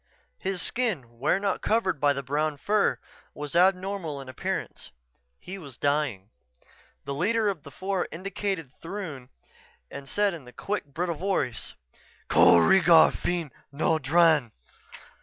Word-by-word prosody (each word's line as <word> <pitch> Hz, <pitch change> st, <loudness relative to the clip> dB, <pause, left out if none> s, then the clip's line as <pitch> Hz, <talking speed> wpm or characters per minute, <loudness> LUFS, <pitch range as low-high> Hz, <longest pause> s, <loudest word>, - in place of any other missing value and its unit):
His 190 Hz, -2 st, -2 dB
skin, 150 Hz, -, -2 dB
where 145 Hz, +8 st, +2 dB
not 195 Hz, -2 st, -1 dB
covered 200 Hz, -8 st, +1 dB
by 145 Hz, 0 st, +4 dB
the 140 Hz, 0 st, -5 dB
brown 150 Hz, +3 st, -1 dB
fur, 205 Hz, +7 st, +1 dB, 0.4 s
was 150 Hz, +1 st, -6 dB
abnormal 185 Hz, -4 st, +1 dB
in 135 Hz, -1 st, -9 dB
appearance. 130 Hz, -, -4 dB, 0.5 s
He 195 Hz, +2 st, -8 dB
was 140 Hz, -8 st, -10 dB
dying. 140 Hz, -9 st, -1 dB, 0.7 s
The 140 Hz, -, -3 dB
leader 210 Hz, +8 st, +1 dB
of 185 Hz, -6 st, -4 dB
the 140 Hz, -, -11 dB
four 190 Hz, +4 st, -2 dB
indicated 185 Hz, -3 st, -4 dB
Throon 165 Hz, -9 st, -6 dB, 0.6 s
and 135 Hz, -1 st, -8 dB
said 205 Hz, -2 st, +1 dB
in 150 Hz, -7 st, -9 dB
a -, -, -11 dB
quick, 205 Hz, -5 st, -3 dB
brittle 170 Hz, +5 st, -3 dB
voice: 165 Hz, -9 st, -2 dB, 0.6 s
"_Ko 85 Hz, -1 st, +6 dB
reegar 170 Hz, -4 st, +6 dB
feen 170 Hz, -5 st, -2 dB, 0.2 s
no 160 Hz, +3 st, +1 dB
dran! 155 Hz, -3 st, +3 dB
165 Hz, 140 wpm, -27 LUFS, 140-195 Hz, 0.7 s, Ko